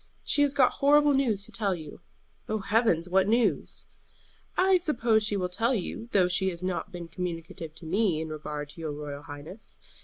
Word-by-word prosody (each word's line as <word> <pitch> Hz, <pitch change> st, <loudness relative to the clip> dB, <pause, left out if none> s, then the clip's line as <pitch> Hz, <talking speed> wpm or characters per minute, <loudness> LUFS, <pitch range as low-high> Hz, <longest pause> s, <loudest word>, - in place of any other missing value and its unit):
She 290 Hz, -, +2 dB
has 285 Hz, -1 st, +3 dB
got 260 Hz, -3 st, +5 dB
horrible 295 Hz, +1 st, +5 dB
news 230 Hz, -8 st, +1 dB
to -, -, -9 dB
tell 200 Hz, -4 st, 0 dB
you." 155 Hz, -3 st, -10 dB, 0.5 s
"Oh, 215 Hz, -, +1 dB
heavens! 205 Hz, -5 st, +2 dB
What 190 Hz, +1 st, +3 dB
news?" 235 Hz, +2 st, +1 dB, 0.7 s
"I 375 Hz, 0 st, +5 dB
suppose 235 Hz, -9 st, +2 dB
she 210 Hz, -1 st, 0 dB
will 180 Hz, -2 st, 0 dB
tell 225 Hz, +8 st, +1 dB
you, 225 Hz, +3 st, -4 dB
though 185 Hz, -3 st, +4 dB
she 190 Hz, +1 st, +2 dB
has 175 Hz, -1 st, -6 dB
not 185 Hz, +2 st, -2 dB
been 175 Hz, -2 st, -7 dB
communicative 165 Hz, -2 st, -6 dB
to 165 Hz, -, -11 dB
me 185 Hz, -1 st, +1 dB
in 160 Hz, 0 st, -4 dB
regard 150 Hz, -1 st, -5 dB
to 165 Hz, -, -9 dB
your 155 Hz, -2 st, -3 dB
royal 145 Hz, -1 st, -6 dB
highness. 145 Hz, +9 st, -9 dB
190 Hz, 190 wpm, -28 LUFS, 165-230 Hz, 0.7 s, got